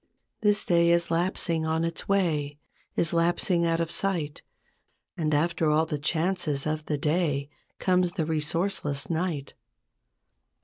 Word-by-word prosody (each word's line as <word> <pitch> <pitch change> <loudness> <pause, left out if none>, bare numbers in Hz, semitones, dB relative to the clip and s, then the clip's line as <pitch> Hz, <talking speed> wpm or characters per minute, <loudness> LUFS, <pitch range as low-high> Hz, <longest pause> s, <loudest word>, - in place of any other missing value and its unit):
This 205 -1 +2
day 170 -1 +4
is 170 0 +2
lapsing 170 -1 0
on 160 +1 0
its 165 +3 -3
way, 155 -7 +1 0.4
Is 165 - +1
lapsing 170 +1 +2
out 165 0 +1
of 165 0 -1
sight; 170 -8 -1 0.7
And 155 -2 -1
after 160 +1 +1
all 155 +1 +3
the 150 -2 -3
chances 160 -1 0
of 155 0 -1
the 150 - 0
day 150 -2 0 0.3
Comes 180 -1 +2
the 165 -6 -1
resourceless 155 -1 -1
night. 160 -4 -2
165 Hz, 135 wpm, -27 LUFS, 150-175 Hz, 0.7 s, day